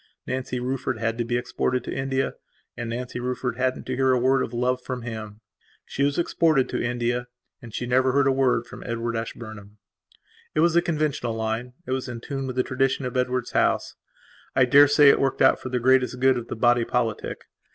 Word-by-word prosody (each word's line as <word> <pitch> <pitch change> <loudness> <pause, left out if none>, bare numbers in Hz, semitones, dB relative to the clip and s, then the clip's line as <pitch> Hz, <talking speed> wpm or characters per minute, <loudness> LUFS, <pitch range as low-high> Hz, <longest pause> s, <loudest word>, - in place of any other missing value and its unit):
Nancy 130 -1 -3
Rufford 130 0 -2
had 115 +1 -2
to - - +2
be 120 +1 -1
exported 125 +1 -1
to - - -5
India, 135 0 -1 0.4
and 120 -1 -5
Nancy 125 +1 -4
Rufford 125 -1 -3
hadn't 130 0 -1
to 130 - -3
hear 130 0 +3
a - - +3
word 130 +2 +3
of - - -3
love 125 +1 0
from 125 -1 -5
him. 110 -2 -7 0.4
She - - -5
was 140 0 +2
exported 160 -5 +2
to - - -2
India 120 0 -1 0.3
and 120 - -10
she 120 - -4
never 130 +1 +3
heard 140 +1 +3
a 135 - +4
word 130 -3 +2
from - - -11
Edward 115 0 -3
Ashburnham. 110 -2 -7 0.8
It 155 - +3
was 170 0 +4
the 170 - +5
conventional 150 -8 -1
line; 115 +2 -3
it - - -6
was 130 0 -2
in 120 -2 -6
tune 135 +2 -4
with 130 - -5
the 130 - +2
tradition 135 +1 0
of 125 +1 -4
Edward's 125 -1 -1
house. - - +1 0.6
I 130 - +5
daresay 145 +2 +7
it - - +5
worked 135 -1 0
out - - +5
for 130 - -6
the 125 0 -1
greatest 130 0 +2
good 130 0 +4
of 120 -1 -4
the - - -4
body 120 +1 +3
politic. 115 -2 -2
125 Hz, 210 wpm, -25 LUFS, 120-130 Hz, 0.8 s, daresay